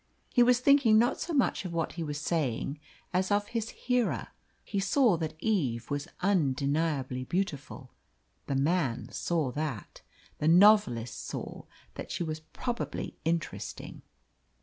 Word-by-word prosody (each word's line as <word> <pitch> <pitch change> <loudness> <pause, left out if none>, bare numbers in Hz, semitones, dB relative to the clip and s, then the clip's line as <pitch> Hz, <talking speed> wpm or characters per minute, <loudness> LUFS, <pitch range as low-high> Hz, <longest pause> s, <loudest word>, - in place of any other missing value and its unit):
He 245 - +5
was 245 0 +5
thinking 255 -4 +5
not 240 +4 +3
so 345 - -3
much 275 -9 +1
of 180 -2 -5
what 165 -1 -1
he 170 - -5
was 150 -2 -3
saying 145 -3 -1 0.3
as 185 +1 +1
of 205 0 +1
his 225 -1 -2
hearer. 250 -2 -1 0.3
He 200 - -2
saw 205 +2 +3
that 160 -1 -4
Eve 140 - -1
was 145 +2 -2
undeniably 145 -6 0
beautiful 145 -5 -3 0.6
the 140 - -1
man 140 -3 0
saw 160 -7 -1
that. 145 - -5 0.4
The 150 - 0
novelist 170 - +5
saw - - -6 0.3
that - - -7
she - - -2
was 155 -1 -4
probably 235 +9 -5
interesting. 165 0 -3
165 Hz, 140 wpm, -29 LUFS, 140-210 Hz, 0.6 s, He